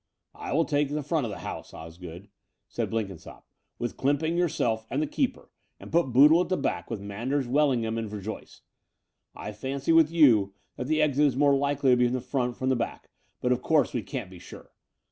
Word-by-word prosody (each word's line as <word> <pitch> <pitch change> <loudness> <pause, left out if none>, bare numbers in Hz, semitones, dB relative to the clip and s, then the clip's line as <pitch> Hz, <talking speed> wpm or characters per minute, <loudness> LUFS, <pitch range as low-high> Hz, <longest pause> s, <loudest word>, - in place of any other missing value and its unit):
"I - - -7
will 165 +3 +2
take 145 -2 0
the 150 +1 -3
front 150 -3 -1
of - - -5
the - - -6
house, - - -7
Osgood," 85 +3 -10 0.4
said - - -3
Blenkinsopp, 100 -7 -5 0.3
"with 120 - -4
Clsmiping, 145 +4 0
yourself, 120 -10 0
and 135 - -1
the 155 - +1
keeper, 260 - -2 0.3
and - - -11
put 165 -6 +2
Boodle 150 +7 +7
at - - -3
the 185 - +1
back 85 - -2
with 115 - -4
Manders, 120 +7 -3
Wellingham, 120 -5 +1
and 110 -2 -4
Verjoyce. 105 +1 -8 0.7
I 105 - -6
fancy, 135 +7 -3
with 165 -2 +6
you, 115 -12 +4 0.2
that 125 - -5
the 155 +1 +2
exit 150 0 +3
is 130 - -1
more 140 0 +4
likely 140 -1 +1
to 125 - +5
be 125 - +3
from 120 +1 0
the - - -1
front 125 -1 -2
than 130 - -1
the 130 - +3
back; 115 - -5 0.3
but, 125 - +1
of 125 0 +1
course, 155 0 +2
we 120 - -1
can't 100 0 -6
be 90 - -11
sure. - - -13
130 Hz, 210 wpm, -27 LUFS, 110-150 Hz, 0.7 s, Boodle